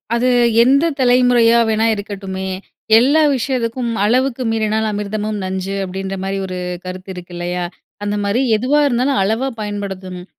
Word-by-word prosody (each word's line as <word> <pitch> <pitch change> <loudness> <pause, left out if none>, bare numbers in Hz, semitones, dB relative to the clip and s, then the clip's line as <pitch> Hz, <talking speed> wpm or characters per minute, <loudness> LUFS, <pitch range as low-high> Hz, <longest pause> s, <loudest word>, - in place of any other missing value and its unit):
அது 245 +2 +2 0.3
எந்த 275 +6 +4
தலைமுறையா 245 -2 +4
வேணா 220 0 +1
இருக்கட்டுமே. 195 -2 -5 0.5
எல்லா 280 +7 +4
விஷயதுக்கும், 245 -1 -2
"அளவுக்கு 255 +3 +1
மீறினால் 220 0 0
அமிர்தமும் 210 +1 -3
நஞ்சு." 190 +1 -3
அப்படீன்ற 190 +1 -4
மாரி 195 0 -2
ஒரு 185 -1 -5 0.3
கருத்து 185 +1 -7
இருக்கு 180 -1 -10
இல்லையா? 175 +1 -3 0.4
அந்தமாரி 205 +3 0
எதுவா 255 +7 +2
இருந்தாலும் 260 +2 +1
அளவா 220 +7 0
பயன்படுத்தணும். 195 -3 -5
215 Hz, 125 wpm, -18 LUFS, 195-245 Hz, 0.5 s, எந்த